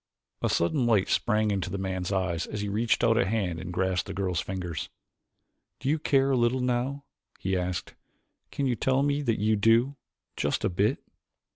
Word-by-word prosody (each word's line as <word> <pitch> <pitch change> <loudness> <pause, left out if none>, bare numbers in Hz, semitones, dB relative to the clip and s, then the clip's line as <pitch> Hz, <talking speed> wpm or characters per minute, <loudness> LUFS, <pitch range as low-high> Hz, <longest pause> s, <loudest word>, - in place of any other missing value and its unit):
A - - +1
sudden 120 - +1
light 105 -4 +3
sprang 105 -3 +1
to 90 - -3
the 100 - -3
man's 95 -1 -3
eyes 90 -4 -1
as 105 - -4
he 105 - -2
reached 110 +4 +1
out 115 0 +4
a - - +3
hand 95 -6 -1
and 90 0 -6
grasped 95 0 0
the 100 - -6
girl's 90 -3 -1
fingers. 90 -4 -4 0.9
"Do 135 - -2
you 155 +2 +2
care 135 -2 +2
a - - +3
little 120 +1 +2
now?" 125 +3 -1 0.3
he 95 0 -1
asked. 90 -1 -3 0.6
"Can't 140 - -1
you 125 - +1
tell 130 +4 +1
me 145 0 +1
that 115 -6 0
you 110 +2 +2
do 115 +6 +3 0.4
just - - -1
a - - +2
bit?" 100 +8 0
105 Hz, 190 wpm, -28 LUFS, 95-125 Hz, 0.9 s, out